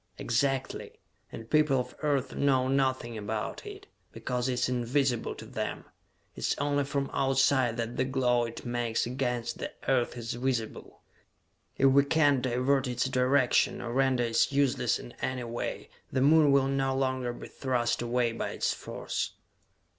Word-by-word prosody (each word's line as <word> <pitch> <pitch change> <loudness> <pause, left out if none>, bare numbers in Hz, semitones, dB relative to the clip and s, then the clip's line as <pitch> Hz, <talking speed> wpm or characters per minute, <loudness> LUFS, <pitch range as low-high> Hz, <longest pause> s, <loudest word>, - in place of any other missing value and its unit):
"Exactly! 135 +2 -1 0.4
And 115 - -8
people 150 -1 +3
of 125 - -4
Earth 140 -3 0
know 130 -2 +2
nothing 130 -4 0
about 105 +1 -4
it, - - -9 0.3
because 125 0 -2
it - - +1
is 125 - 0
invisible 125 0 0
to - - -10
them! - - -4 0.5
It - - -9
is - - 0
only 145 0 0
from 140 0 -2
Outside 135 -3 +2
that 115 +1 -3
the - - +2
glow 125 -2 +1
it 115 +2 -8
makes 120 -1 -1
against 125 -1 -2
the - - -4 0.2
Earth 125 -2 +1
is 115 -1 -4
visible! 120 -2 -3 0.8
If 135 0 +5
we 140 +1 +5
can 145 -2 +3
divert 130 +2 +1
its 125 +1 -1
direction, 130 0 +2
or 120 -1 -5
render 130 -1 +2
it 115 +2 +2
useless 135 -4 +2
in - - -10
any 130 -1 -2
way, 120 0 -4 0.2
the 130 - 0
Moon 150 +1 +6
will 140 -1 +4
no 135 -1 0
longer 130 -2 -1
be 120 - -9
thrust 125 -3 -1
away 120 0 +1
by 115 - -3
its - - 0
force!" - - -4
130 Hz, 160 wpm, -29 LUFS, 120-135 Hz, 0.8 s, Moon